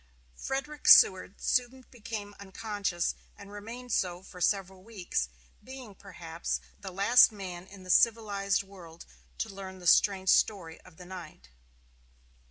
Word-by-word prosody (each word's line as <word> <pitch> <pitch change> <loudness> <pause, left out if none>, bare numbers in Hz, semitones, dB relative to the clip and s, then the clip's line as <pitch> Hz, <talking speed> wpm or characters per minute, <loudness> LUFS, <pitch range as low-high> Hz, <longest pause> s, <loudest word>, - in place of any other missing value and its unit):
Frederick 290 - -5
Seward 190 0 +6
soon 255 +1 -1
became 210 -3 -7
unconscious, 200 -3 -3 0.2
and 200 0 -12
remained 230 +4 -9
so 180 0 -1
for 180 -1 -13
several 190 -1 0
weeks, 180 - -3 0.3
being, 260 -5 -10
perhaps, 170 -4 -5 0.2
the 195 - -7
last 200 +7 +6
man 185 -3 -8
in 195 -1 -13
the 185 - -13
civilized 205 -4 +2
world 175 -4 -14 0.3
to - - -2
learn 190 -1 -9
the 180 - -13
strange 190 +1 +4
story 175 -7 +1
of 160 - -18
the 180 - -12
night. 170 - -11
195 Hz, 135 wpm, -29 LUFS, 180-215 Hz, 0.3 s, Seward